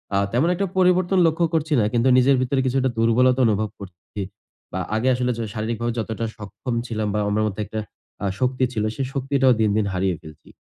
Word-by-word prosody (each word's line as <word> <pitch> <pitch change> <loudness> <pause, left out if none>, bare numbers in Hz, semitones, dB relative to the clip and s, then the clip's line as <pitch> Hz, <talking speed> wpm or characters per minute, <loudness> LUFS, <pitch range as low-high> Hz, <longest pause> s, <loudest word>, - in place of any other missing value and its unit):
আ - - +3 0.2
তেমন 140 +9 +2
একটা 195 - 0
পরিবর্তন 185 0 +3
লক্ষ্য 165 +1 +1
করছি 160 -1 0
না। - - +3
কিন্তু 120 +2 +2
নিজের 135 +2 +5
ভেতরে 130 +1 +1
কিছুটা 130 0 +1
দুর্বলতা 125 +3 +3
অনুভব 105 0 0
করছি। 95 +2 -9 0.5
বা 95 - -2 0.2
আগে 110 +4 0
আসলে 125 0 0
যে - - -3
শারীরিকভাবে 115 +2 -2
যতটা 110 +1 -3
সক্ষম 110 +4 -5
ছিলাম 110 -2 -2
বা 105 - 0
আমার 105 +1 +1
মধ্য 105 -2 -3
একটা 110 +2 -5 0.4
আ - - +1
শক্তি 130 0 0
ছিল 105 - -1
সে 135 - -2
শক্তিটাও 135 -1 +2
দিন, 110 - +3
দিন 105 - +1
হারিয়ে 90 0 0
ফেলছি। 80 -1 -14
120 Hz, 195 wpm, -22 LUFS, 110-135 Hz, 0.5 s, নিজের